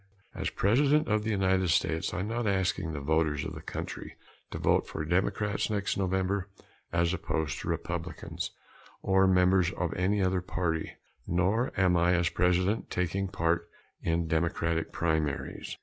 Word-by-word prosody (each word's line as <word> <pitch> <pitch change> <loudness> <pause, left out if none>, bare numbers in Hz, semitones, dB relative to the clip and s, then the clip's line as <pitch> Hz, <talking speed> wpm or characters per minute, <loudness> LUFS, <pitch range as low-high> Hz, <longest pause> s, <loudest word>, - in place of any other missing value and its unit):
As - - -2
President 145 +9 +3
of 105 -1 +2
the 110 - -2
United 95 -2 +2
States, 80 0 +1
I 95 - -2
am 100 - -2
not 115 0 -1
asking 95 -3 0
the 75 - -4
voters 75 0 +1
of - - -5
the - - -8
country - - -6 0.3
to - - -5
vote - - +2
for 80 - -4
Democrats 100 +5 0
next 100 -2 -1
November 95 +1 0 0.4
as 85 +1 +2
opposed 80 -6 -2
to - - -7
Republicans - - -3 0.5
or 95 0 +4
members 90 -1 +4
of 90 -3 -2
any 95 +3 +1
other 95 -1 +1
party. 85 -3 -2 0.3
Nor 95 +8 +1
am 90 -2 +4
I, 85 +1 +3
as 85 -1 +2
President, 90 +5 +1
taking 95 +2 -1
part 85 -1 0 0.3
in 85 0 0
Democratic 80 0 0
primaries. 80 -4 -2
90 Hz, 155 wpm, -29 LUFS, 85-95 Hz, 0.5 s, or